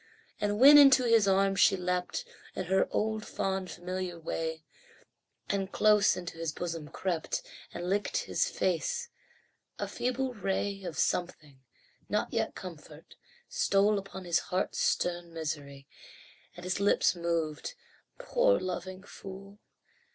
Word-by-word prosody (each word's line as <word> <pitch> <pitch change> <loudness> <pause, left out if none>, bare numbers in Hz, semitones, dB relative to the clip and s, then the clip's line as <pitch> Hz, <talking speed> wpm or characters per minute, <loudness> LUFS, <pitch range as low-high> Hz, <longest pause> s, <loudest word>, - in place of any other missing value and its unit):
And 205 0 0
when 285 +3 +10
into 270 -2 +7
his 230 -4 +4
arms 195 0 +3
she 195 - +5
leapt 180 0 -2 0.3
In 185 - -3
her 190 +2 +2
old 220 0 -1
fond, 190 -3 -2
familiar 180 0 -5
way, 160 0 -4 0.8
And 195 -1 -2
close 210 -2 +4
into 170 -2 -7
his 165 -1 -2
bosom 165 -1 -5
crept, 170 -1 -2 0.3
And 175 +1 -5
licked 200 +2 0
his - - 0
face 485 -1 -1 0.7
a - - -3
feeble 255 +1 -2
ray 195 -1 -2
Of 165 - -5
something 150 -6 -2 0.5
not - - -1
yet - - -1
comfort 160 -3 -11 0.3
stole 210 - +2
Upon 190 -1 -9
his 170 -1 +2
heart's 185 +1 -1
stern 175 -1 0
misery, 140 -3 -5 0.7
And 175 - -9
his 185 +2 -2
lips 200 -2 +3
moved, 170 - -2 0.4
"Poor - - +2
loving 185 +1 -5
fool! 195 0 -11
185 Hz, 130 wpm, -30 LUFS, 170-205 Hz, 0.8 s, when